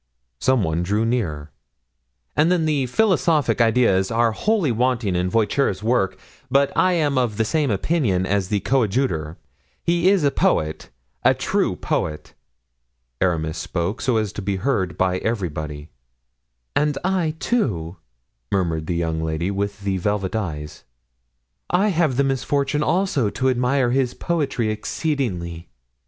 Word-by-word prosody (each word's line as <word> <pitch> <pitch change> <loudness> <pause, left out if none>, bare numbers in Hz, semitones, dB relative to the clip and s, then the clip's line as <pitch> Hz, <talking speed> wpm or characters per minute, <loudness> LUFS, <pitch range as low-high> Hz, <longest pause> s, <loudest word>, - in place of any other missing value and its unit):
Some 130 -4 +2
one 80 -1 0
drew 105 +5 0
near. 80 -12 -2 0.8
"And 160 +4 +3
then 155 -6 +1
philosophic 165 - +2
ideas 115 -5 +3
are 115 0 +2
wholly 195 - +1
wanting 115 -4 0
in 90 +1 0
Voiture's 110 0 +1
works, 105 -5 +1 0.3
but 140 +2 +2
I 185 0 +3
am 145 -6 +1
of 115 -5 -1
the 110 - +1
same 150 +3 +1
opinion 105 - +1
as 100 -1 0
the 100 0 0
coadjutor—he 130 - -1
is 195 -5 +3
a 140 - +3
poet, 80 - 0 0.3
a - - +5
true - - 0
poet." 75 -1 -3 0.9
Aramis 80 -3 0
spoke 90 +5 -3
so 125 -3 +1
as 105 -2 -1
to - - -5
be 100 0 -1
heard 95 -5 -1
by 95 0 +1
everybody. 75 -8 -3 0.9
"And 150 -1 +1
I, 180 -4 0
too," 95 - -1 0.5
murmured 85 -5 0
the 85 - -1
young 80 -1 -1
lady 80 +4 -1
with 100 +1 -3
the 100 -1 -1
velvet 100 +1 -1
eyes. 75 -8 -4 0.9
"I 195 +4 +3
have 160 -8 +1
the 140 - +4
misfortune 140 +2 0
also 170 - +1
to 130 +5 0
admire 125 0 +1
his 130 -1 +1
poetry 140 -9 -1
exceedingly." 105 - -3
115 Hz, 140 wpm, -22 LUFS, 90-140 Hz, 0.9 s, a